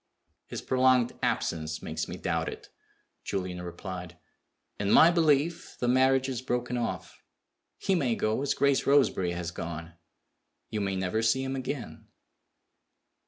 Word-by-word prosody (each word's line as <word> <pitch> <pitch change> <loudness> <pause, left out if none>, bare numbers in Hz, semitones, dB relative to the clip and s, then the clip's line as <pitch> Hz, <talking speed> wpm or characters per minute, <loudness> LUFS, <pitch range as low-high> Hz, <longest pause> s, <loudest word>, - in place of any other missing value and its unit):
"His - - -6
prolonged 130 -2 +3
absence 80 -1 -1
makes - - -3
me - - -6
doubt - - -1
it," - - -10 0.5
Julian 90 -2 -3
replied. 90 0 -7 0.6
"In 100 -1 0
my 160 +10 +7
belief, 160 -1 +1
the 120 - 0
marriage 130 +1 +4
is 130 -3 -3
broken 125 -1 -2
off. 95 -6 -4 0.6
He 195 - 0
may 135 -10 +1
go 110 +4 0
as 140 - 0
Grace 140 -1 +2
Roseberry 130 -11 +3
has 85 -1 -4
gone. 85 -1 -6 0.8
You 105 - -1
may 100 -1 -1
never 95 +4 -1
see 115 +4 +2
him 135 0 -3
again." 130 0 -5
120 Hz, 140 wpm, -29 LUFS, 90-135 Hz, 0.8 s, my